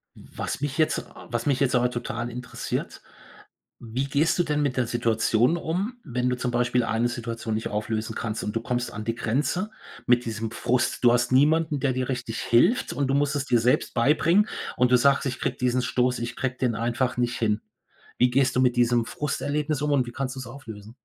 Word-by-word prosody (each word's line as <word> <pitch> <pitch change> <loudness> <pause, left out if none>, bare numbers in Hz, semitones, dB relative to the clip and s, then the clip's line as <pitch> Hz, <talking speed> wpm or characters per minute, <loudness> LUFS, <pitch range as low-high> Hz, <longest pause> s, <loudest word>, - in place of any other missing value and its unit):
Was - - -6
mich 145 +1 -2
jetzt 155 - +2
a - - -14
was 120 0 -2
mich 140 -2 +2
jetzt 135 -1 +2
aber 125 0 +2
total 120 0 -4
interessiert, 125 +1 -5 0.8
wie 120 +4 -3
gehst 145 +5 +1
du 175 - +5
denn 150 -2 0
mit 135 -3 -1
der 120 -2 +1
Situation 115 +4 +2
um, 185 +9 -2
wenn 125 -3 -1
du 125 - -1
zum 125 0 -2
Beispiel 120 0 +1
eine 115 +1 +1
Situation 115 -2 -4
nicht 110 - -2
auflösen 110 +1 -3
kannst 110 -1 -3
und 105 - -4
du 115 - 0
kommst 120 +1 -2
an 105 +1 -5
die 115 +1 -2
Grenze 150 - -1 0.3
mit 120 0 +3
diesem 115 -1 -4
Frust. 120 +1 0
Du 120 - +7
hast 120 +1 +2
niemanden, 150 +3 +3
der 135 0 +1
dir 130 0 -2
richtig 120 -3 -3
hilft 120 - +3
und 140 -1 0
du 135 - 0
musst 145 +1 +1
es 140 -1 -1
dir 120 -4 +3
selbst 125 +3 +1
beibringen 165 - +3 0.3
und 125 0 +3
du 125 - +7
sagst: 140 +3 +3
„Ich 130 - -3
kriege - - -2
diesen 125 0 +1
Stoß 125 0 0
ich 120 0 -4
kriege 130 -1 -2
den 125 -3 +1
einfach 120 +3 -1
nicht 120 0 0
hin.“ 105 -2 0 0.6
Wie 125 - +4
gehst 135 0 +2
du 130 - +3
mit 125 -1 +3
diesem 120 -1 +3
Frusterlebnis 150 +2 -2
um 150 - 0
und 135 -3 +3
wie - - -6
kannst 130 +1 -4
du's 130 -2 -7
auflösen? 110 -5 -10
125 Hz, 215 wpm, -25 LUFS, 120-140 Hz, 0.8 s, Du